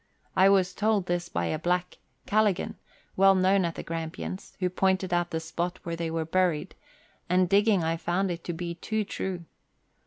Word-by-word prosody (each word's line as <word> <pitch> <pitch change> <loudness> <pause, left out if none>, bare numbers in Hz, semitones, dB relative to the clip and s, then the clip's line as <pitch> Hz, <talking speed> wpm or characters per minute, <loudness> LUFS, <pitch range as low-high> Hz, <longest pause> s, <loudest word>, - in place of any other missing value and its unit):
I 190 +1 +6
was 190 -2 +3
told 210 -2 +1
this 175 -1 -2
by 85 - -1
a 155 - -1
black, 180 +2 -1
" - - -44
Calligan," 210 -3 +1 0.4
well 195 0 +6
known 190 0 +3
at 170 - -3
the - - -6
Grampians, 165 +3 -5
who 185 - +1
pointed 190 0 +1
out 175 0 +1
the 160 - -2
spot 170 +3 -3
where 170 -1 -3
they 165 -1 -3
were 165 0 -2
buried, 175 -2 0 0.6
and 180 0 +3
digging 200 -1 +3
I 165 +1 0
found 175 +3 0
it 170 -1 -5
to 175 - -2
be 170 +1 -4
too 215 +5 -2
true. 185 -3 -4
180 Hz, 190 wpm, -27 LUFS, 170-190 Hz, 0.6 s, I